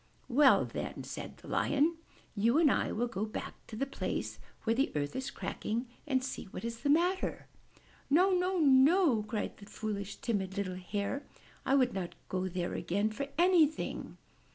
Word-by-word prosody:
''Well 275 +1 +5
then/' - - -5
said - - -7
the - - -14
Lion, 310 +4 +2 0.4
*'you 230 +6 +3
and 315 -4 +5
I - - +1
will 235 +3 0
go 230 -4 -3
back 215 - -4
to 220 - -8
the 275 - 0
place 275 - -3 0.2
where 225 - +2
the 270 +3 +1
earth 145 -1 -2
is 260 0 -2
cracking 230 +4 -3 0.2
and 260 -3 +1
see 265 - -4
what 195 - -7
is 230 0 -4
the 285 - -1
matter.*' 355 +5 +2 0.6
*'No, 360 +7 +5
no, 365 +1 +1
no!'' 285 - +5
cried 215 0 -4
the 200 - -13
foolish, 210 -2 -4
timid, 195 -5 -2
little 195 -2 -1
Hare, 200 +8 -3 0.5
"I 270 - +4
would 255 -3 +3
not 185 -3 -4
go 185 0 -1
there 175 -1 -3
again 205 +4 0
for 275 +6 -4
anything." 335 -3 +2
240 Hz, 175 wpm, -32 LUFS, 205-290 Hz, 0.6 s, Well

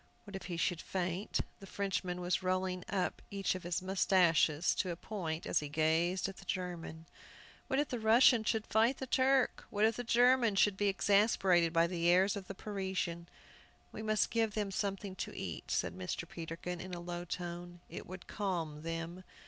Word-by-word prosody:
What 205 -3 -10
if 190 - -6
he 175 -2 -4
should 170 0 0
faint? 185 +2 -2 0.2
The 195 - -11
Frenchman 185 -2 -2
was 180 +1 0
rolling 185 -1 -1
up 190 -3 -1
each 195 -1 0
of 185 - -5
his 175 +1 -2
mustaches 175 -4 +3
to 185 - -1
a 170 - -2
point 165 -4 -4
as - - +2
he 150 - -5
gazed 165 +4 +1
at 195 -2 -8
the 190 - -12
German. 175 -3 -4 0.6
What 265 - 0
if 290 0 +1
the 245 - -3
Russian 225 +1 +6
should 220 0 0
fight 225 +5 +3
the 265 - -4
Turk? 260 +1 +2
What 210 +1 +2
if 225 0 +2
the 245 - -3
German 245 -1 +4
should 200 0 +4
be 205 +1 +1
exasperated 195 -3 +3
by 165 0 +4
the 170 -1 -1
airs 190 +3 +4
of 195 -2 -6
the 195 - -6
Parisian? 190 -4 -3 0.6
"We - - -7
must 215 -1 +1
give 225 -2 +1
them 205 -2 -1
something 195 -1 -3
to - - -5
eat," - - -5
said 85 - 0
Mr. 95 - -4
Peterkin, 170 +1 -6
in 185 -1 -6
a - - -6
low 175 0 -5
tone. 175 0 -6
"It - - -8
would 185 0 -9
calm 170 -7 -3
them." 165 +2 -5
185 Hz, 190 wpm, -34 LUFS, 170-205 Hz, 0.6 s, Russian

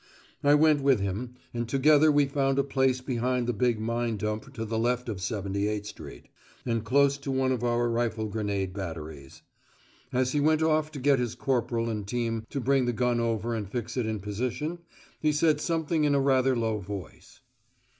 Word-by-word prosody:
I 145 +1 +6
went 150 -1 +4
with 135 -4 +4
him, 100 +6 -3 0.2
and 120 -1 -3
together 150 +3 +5
we 145 -1 +4
found 135 -1 0
a 140 - +3
place 130 -2 +1
behind 125 -1 -1
the 120 - 0
big 120 +1 +1
mine 115 0 -1
dump 105 +5 -3
to 115 -3 -3
the 110 0 -2
left 125 +2 0
of 105 -5 -4
78 100 +1 -2
Street, - - -10 0.4
and 115 -2 -1
close 140 +4 +3
to 140 - -6
one 130 -1 +1
of 125 -2 -1
our 120 0 +1
rifle 115 -2 -1
grenade 100 -3 -2
batteries. 80 -7 -7 0.7
As 130 -1 +1
he 145 - +1
went 155 +2 +3
off 155 -1 +2
to 145 - -6
get 135 0 +3
his 120 -2 -2
corporal 120 -3 0
and 105 -3 -3
team 115 -1 -2
to 140 - -3
bring 135 0 +2
the 120 - 0
gun 120 0 +1
over 115 0 -1
and 105 -4 -4
fix 120 +1 -4
it 125 -4 -1
in 110 -2 -3
position, 125 - -3 0.4
he 155 - +2
said 150 0 +2
something 165 -1 0
in 145 -1 +3
a - - +3
rather 135 -1 +3
low 110 -2 0
voice. 100 -2 -9
120 Hz, 195 wpm, -28 LUFS, 110-140 Hz, 0.7 s, I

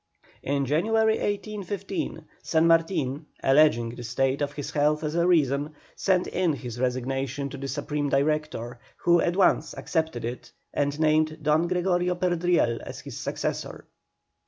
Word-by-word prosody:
In 140 0 0
January, 220 - +2
1815, 200 -5 -3 0.2
San 160 0 +2
Martin, 165 -4 +1 0.2
alleging 135 -4 +4
the 120 - -9
state 135 +4 0
of 145 0 -1
his 145 -1 -5
health 150 +1 +1
as 150 0 -2
a 170 +1 +2
reason, 150 -3 +2 0.2
sent 185 -2 +2
in 180 -4 0
his 125 -4 -6
resignation 135 +2 -2
to 140 - -7
the 135 0 -5
Supreme 145 0 -2
Director, 140 -4 -1 0.2
who 175 0 +4
at 175 - 0
once 195 - +2
accepted 160 -9 -2
it 120 +2 -6 0.2
and 145 +1 -1
named 155 0 +2
Don 155 +3 +3
Gregorio 180 0 +1
Perdriel 175 -9 +1
as - - -8
his - - -8
successor. - - -4
150 Hz, 145 wpm, -26 LUFS, 135-175 Hz, 0.2 s, alleging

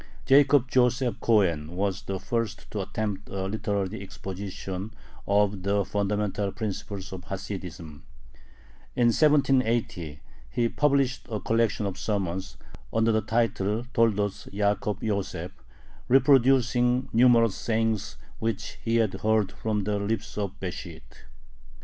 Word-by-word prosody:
Jacob 140 -1 +5
Joseph 125 0 +2
Cohen 90 -8 +2
was 95 0 -1
the 95 -1 -4
first 115 0 -3
to 105 - -2
attempt 105 0 -4
a 95 -1 -3
literary 100 -2 -2
exposition 95 +1 -6 0.3
of 100 -1 +2
the 100 +1 +1
fundamental 105 0 -1
principles 100 -2 -5
of 90 -1 -8
Hasidism. 90 -6 -7 0.9
In 120 -1 +4
1780 120 - +2 0.3
he 115 - 0
published 140 -3 +1
a 110 -2 -2
collection 115 -1 +1
of 95 -2 -4
sermons, 95 -3 -2 0.3
under 115 0 +2
the 110 0 +2
title 110 0 0
Toldoth 105 -2 +1
Ya`kob 105 0 0
Yoseph, 95 -5 -2 0.6
reproducing 130 -2 +4
numerous 115 -2 +5
sayings 110 -2 -1 0.2
which 115 0 -3
he 115 0 0
had 110 -4 +2
heard 110 -2 +2
from 105 -2 -2
the 105 +1 -1
lips 110 +2 -3
of 100 -2 -4
Besht. 85 -8 -8
105 Hz, 120 wpm, -27 LUFS, 95-115 Hz, 0.9 s, Jacob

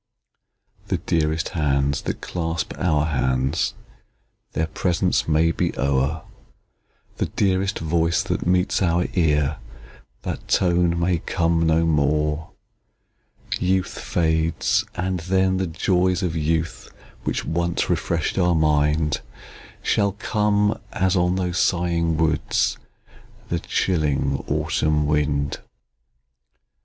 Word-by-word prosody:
The - - 0
dearest 80 -1 0
hands 70 -3 0
that - - -4
clasp 80 -2 -3
our 75 -5 +2
hands, 65 -3 0 0.8
Their 80 - 0
presence 90 +3 0
may 80 +1 +3
be - - -2
o'er; 70 +3 0 0.9
The - - 0
dearest 95 0 0
voice 80 +1 +1
that - - -2
meets 90 +2 +2
our 85 -1 +2
ear, 75 -5 +2 0.7
That - - -5
tone 85 -2 +2
may 85 0 +1
come 85 -1 +1
no 80 +1 +3
more! 75 0 +1 1.1
Youth 95 0 0
fades; 80 -1 +1
and 95 -1 -1
then, 95 +2 +1
the 95 0 -1
joys 90 +2 +1
of 85 -3 -1
youth, 80 +1 -1 0.3
Which - - -2
once 85 +1 -1
refresh'd 85 +2 -1
our 90 -1 +3
mind, 75 -1 +2 0.6
Shall 100 -2 +2
come, 105 0 +1
as, 95 0 +1
on 90 0 +2
those 90 -2 -1
sighing 85 -2 +1
woods, 80 -1 +1 0.7
The - - 0
chilling 75 -5 0
autumn 75 -1 +1
wind. 75 -1 0
80 Hz, 110 wpm, -23 LUFS, 75-90 Hz, 1.1 s, may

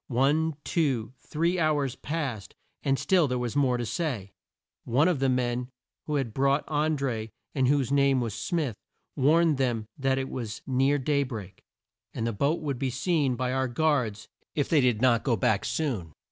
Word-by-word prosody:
One, 145 +5 +2
two, 130 - 0
three 170 +6 -1
hours 145 -5 +1
passed, 140 -10 -4 0.3
and 135 -1 +1
still 180 -1 +3
there 125 -1 -1
was 120 0 -3
more 130 -4 +3
to 120 - -2
say. 115 - -3 0.5
One 135 +8 +3
of 175 -6 +1
the 135 0 +2
men 125 -1 0 0.4
who 150 - -1
had 130 -6 -1
brought 140 +3 +2
An 155 0 +1
dré, 115 -5 -2 0.2
and 130 -3 +2
whose 140 -1 +2
name 140 -1 +4
was 115 -4 -2
Smith, 150 - -2 0.4
warned 155 +2 +4
them 120 -5 0
that 135 0 +1
it 135 0 -2
was 115 -4 -5
near 135 +2 +2
day 140 +1 +1
break, 110 -8 -6 0.5
and 115 - -2
the 115 - -1
boat 140 +11 0
would 140 -5 -2
be 135 -1 0
seen 140 0 +1
by 125 +1 -1
our 130 0 +1
guards 120 -6 0 0.3
if 145 - +1
they 155 -3 +4
did 125 -2 +2
not 120 -3 +4
go 125 -5 +2
back 100 +1 +1
soon. 115 - -2
135 Hz, 185 wpm, -27 LUFS, 120-150 Hz, 0.5 s, name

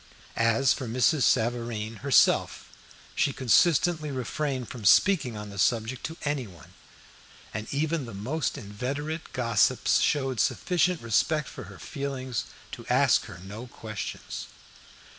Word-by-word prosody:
As 115 +4 +3
for 130 - -5
Mrs. 130 +5 +2
Savareen 115 -2 0
herself, 140 +3 +3 0.4
she 140 - +1
consistently 155 - +3
refrained 130 0 -3
from 120 -1 -9
speaking 125 - +4
on 105 -1 -7
the 100 - -8
subject 115 +4 +1
to 160 +1 -6
anyone, 120 - -4 0.8
and 105 +1 -5
even 155 0 -1
the 115 -3 -8
most 135 +11 -2
inveterate 140 +10 -5
gossips 120 0 +2
showed 135 -5 +1
sufficient 180 -4 +1
respect 150 +7 +1
for - - -9
her - - -12
feelings 135 -4 -4 0.3
to - - -8
ask - - +4
her - - -10
no 105 +6 -8
questions. 110 -4 -6
125 Hz, 125 wpm, -27 LUFS, 110-145 Hz, 0.8 s, speaking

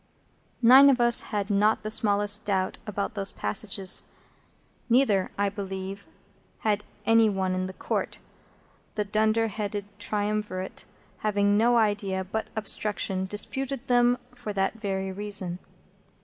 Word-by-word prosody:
Nine 265 +4 +8
of 260 -2 +3
us 240 0 +5
had 205 -1 -2
not 210 +2 +2
the 215 - -4
smallest 205 -1 +2
doubt 190 -2 -1
about 200 -1 -3
those 200 -2 +2
passages, 190 - -1 0.8
neither, 230 -6 +3
I 200 0 +1
believe, 195 -1 -6 0.5
had 210 -1 0 0.2
any 225 0 +5
one 190 -2 -1
in 185 0 -2
the 190 - -8
Court; - - -3 0.8
the 210 - -1
dunder 215 +2 +1
headed 205 -1 -4
triumvirate, 205 -2 -3 0.3
having 205 -1 +1
no 235 +3 +3
idea 205 -4 0
but 220 +4 -4
obstruction, 205 -3 0
disputed 265 +6 -1
them 245 -1 +3 0.2
for 240 -4 -6
that 195 -1 0
very 195 -2 -3
reason. 195 -3 -2
205 Hz, 130 wpm, -26 LUFS, 195-220 Hz, 0.8 s, Nine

